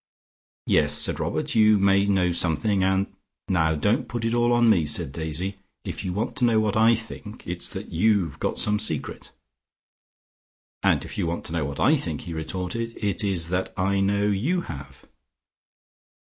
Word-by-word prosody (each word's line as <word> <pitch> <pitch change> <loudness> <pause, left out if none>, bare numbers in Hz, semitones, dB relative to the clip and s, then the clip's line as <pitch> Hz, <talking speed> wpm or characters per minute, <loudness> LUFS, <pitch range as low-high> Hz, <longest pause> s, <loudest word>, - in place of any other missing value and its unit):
"Yes," 75 -1 +3
said - - +1
Robert, - - -2
"you 110 -1 +5
may 100 0 +3
know 95 -3 +2
something, 85 +4 +1
and 95 +1 +2 0.2
" - - -61
"Now 80 -4 +2
don't 105 - 0
put 115 0 -4
it 115 - 0
all 120 0 +2
on 120 0 +4
me," 100 -8 +4
said 75 - +1
Daisy. 85 +6 -4 0.3
"If - - -5
you 90 - -3
want 105 +6 -3
to 125 - +2
know 115 -2 +3
what 105 -1 0
I 115 +1 +5
think, 110 0 -9
it 90 0 -4
is - - 0
that - - -7
you've 95 -4 +1
got - - -2
some 105 0 +2
secret." - - -1 1.5
"And - - +2
if - - -7
you 90 - 0
want 85 +1 -4
to 85 - -6
know 80 -4 -1
what 70 0 -6
I 145 - +4
think," 80 - -3
he 85 - -7
retorted, 90 +8 -4
"it 100 -1 -1
is 90 -5 0
that 90 +1 -1
I 95 +1 +1
know 100 +1 +1
you 120 - 0
have." 70 - -10
100 Hz, 190 wpm, -24 LUFS, 85-110 Hz, 1.5 s, you